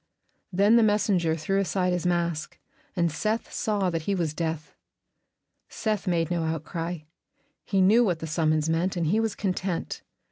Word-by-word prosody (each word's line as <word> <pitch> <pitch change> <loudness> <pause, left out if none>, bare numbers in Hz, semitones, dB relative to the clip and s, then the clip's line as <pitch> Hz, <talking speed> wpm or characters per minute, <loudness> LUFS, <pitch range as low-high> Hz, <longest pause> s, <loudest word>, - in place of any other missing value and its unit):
Then 200 +5 +4
the - - +6
messenger 205 -6 +2
threw 180 +5 0
aside 180 0 0
his 180 0 -1
mask, 170 -3 -1 0.4
and 170 -3 +1
Seth 215 +8 -2
saw 200 -4 0
that 165 -1 -2
he 200 +5 -1
was 165 -4 -1
Death. 160 -2 -3 1.0
Seth 215 -3 -2
made 170 -2 +1
no 175 -1 0
outcry; 165 +1 -3 0.6
he 195 -2 +1
knew 215 +6 +6
what 180 -7 +1
the 160 - -6
summons 155 -1 +1
meant, 165 +4 0
and 170 - 0
he 195 +8 +2
was 225 -2 -1
content. 185 -3 -2
175 Hz, 165 wpm, -26 LUFS, 165-200 Hz, 1.0 s, the